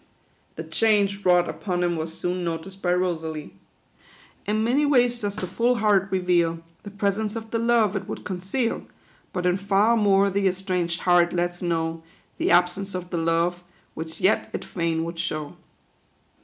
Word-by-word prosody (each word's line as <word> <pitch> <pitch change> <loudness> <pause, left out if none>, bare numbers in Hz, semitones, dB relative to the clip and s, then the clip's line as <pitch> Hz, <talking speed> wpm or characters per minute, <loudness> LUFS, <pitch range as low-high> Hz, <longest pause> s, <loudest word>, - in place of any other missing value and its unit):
The - - -5
change 200 -2 +1
wrought 180 -1 +4
upon 180 -3 -2
him 175 -1 +1
was 160 0 -3
soon 180 +2 -3
noticed 170 +3 -5
by 175 - +1
Rosalie. 165 -4 -2 0.9
"In 215 +1 +1
many 255 +6 +2
ways 245 -4 +3
does 205 -2 -3
the 205 - -3
full 235 +7 +1
heart 205 -4 +3
reveal 175 -3 +1 0.2
The 205 - -9
presence 205 +1 -1
of 225 -1 -6
the 230 - 0
love 230 -3 +2
it 195 -1 -3
would - - -6
conceal; 195 +6 -2 0.4
But 180 -1 -3
ill 180 0 +3
far 200 +3 +3
more 200 -2 +3
the 195 0 +1
estranged 180 -2 -1
heart 175 -1 +4
lets 175 0 -1
know 165 -2 -1 0.4
The - - +1
absence 180 +2 +2
of 180 -1 -6
the 170 - -1
love, 170 +2 0 0.3
which 160 0 -6
yet 195 +3 +2
it - - -4
fain 165 -2 -1
would 165 0 -6
show." 155 -2 -3
185 Hz, 170 wpm, -24 LUFS, 175-205 Hz, 0.9 s, wrought